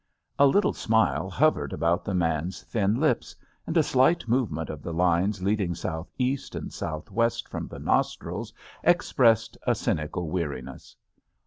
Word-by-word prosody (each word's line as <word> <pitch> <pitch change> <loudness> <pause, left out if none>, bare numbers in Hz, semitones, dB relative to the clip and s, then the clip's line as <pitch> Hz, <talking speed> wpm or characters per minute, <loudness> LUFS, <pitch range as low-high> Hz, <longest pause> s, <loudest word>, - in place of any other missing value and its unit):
A 140 - +7
little 200 +10 +3
smile 110 0 +1
hovered - - +2
about 85 +3 +1
the 100 - -2
man's 85 0 -1
thin 105 +1 0
lips, 155 +1 0 0.3
and 165 - 0
a 160 - +5
slight 135 +2 +3
movement 110 - 0
of 75 -1 -8
the 85 - -5
lines 90 +3 +1
leading 100 -3 0
southeast 125 - -3
and - - -6
southwest 105 +9 -2
from - - -5
the - - -9
nostrils - - -1 0.3
ex 175 +1 +2
pressed 115 -3 +3
a - - +4
cynical 80 +2 -2
weariness. 85 -6 -5
100 Hz, 145 wpm, -26 LUFS, 85-125 Hz, 0.3 s, A